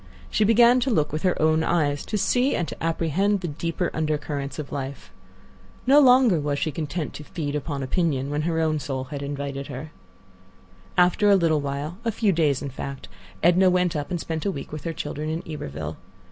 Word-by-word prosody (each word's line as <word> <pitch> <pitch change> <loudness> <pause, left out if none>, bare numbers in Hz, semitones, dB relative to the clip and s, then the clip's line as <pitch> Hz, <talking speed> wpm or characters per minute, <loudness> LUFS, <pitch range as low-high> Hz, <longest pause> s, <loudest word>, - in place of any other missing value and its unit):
She 215 - +2
began 235 +3 +6
to 260 +2 0
look 155 - +1
with 155 - -2
her 180 -2 +1
own 155 +1 +3
eyes; 145 -5 +1
to 215 - -1
see 250 +6 +2
and 170 - -1
to - - -8
apprehend 170 +5 +1
the 175 - -3
deeper 165 +3 -2
undercurrents 150 -2 -2
of 150 -3 -6
life. 140 -1 -6 0.7
No 275 +3 +7
longer 250 - +6
was 145 -1 -1
she 155 - -1
content 155 +2 -4
to 150 - -8
"feed 150 -2 -4
upon 145 -1 -3
opinion" 140 -1 0
when 145 +1 0
her 165 +1 0
own 155 -1 +1
soul 135 -2 -3
had 140 - -4
invited 140 -1 -4
her. 140 +3 -7 1.1
After 180 +3 +4
a 200 - +7
little 165 -5 +2
while, 145 +5 -4
a 230 - 0
few 215 -1 +1
days, 150 -6 +1
in 140 - -4
fact, 135 +1 -7 0.3
Edna 180 +2 +5
went 180 -2 +1
up 145 -1 -3
and 175 -2 -2
spent 160 -1 -4
a - - 0
week 140 -6 -7
with 155 +1 -7
her 165 - -2
children 150 -1 -4
in 160 +2 -3
Iberville. 80 - -5
155 Hz, 200 wpm, -24 LUFS, 145-180 Hz, 1.1 s, No